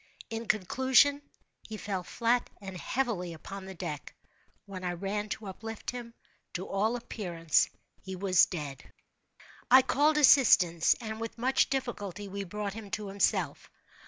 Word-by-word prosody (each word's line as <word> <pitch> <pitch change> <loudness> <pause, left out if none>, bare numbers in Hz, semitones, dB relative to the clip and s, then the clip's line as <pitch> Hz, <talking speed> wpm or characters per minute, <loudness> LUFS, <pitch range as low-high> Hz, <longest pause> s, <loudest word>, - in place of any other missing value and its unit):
In 225 0 -4
conclusion, 260 +7 +3 0.5
he 215 - -5
fell 200 -3 -3
flat 235 +6 0
and 190 -2 -8
heavily 190 -4 -2
upon 195 +4 -8
the 190 0 -8
deck. 160 -5 -6 0.5
When 190 -2 -8
I 180 -1 -1
ran 200 +4 -3
to 215 - -5
uplift 220 +3 -6
him, 240 -1 -8 0.4
to 185 +2 -4
all 215 +4 0
appearance 175 -9 0 0.3
he 190 -1 -6
was 185 -1 +4
dead. 145 -6 -7 0.8
I 260 +1 +8
called 300 +4 +3
assistance, 195 - +6
and, 220 -1 -6
with 230 +1 -5
much 255 +3 +2
difficulty, 205 -7 -3
we 200 +1 -4
brought 205 +1 -4
him 215 -2 -8
to 205 +1 -4
himself. 200 +1 0
205 Hz, 145 wpm, -30 LUFS, 185-235 Hz, 0.8 s, I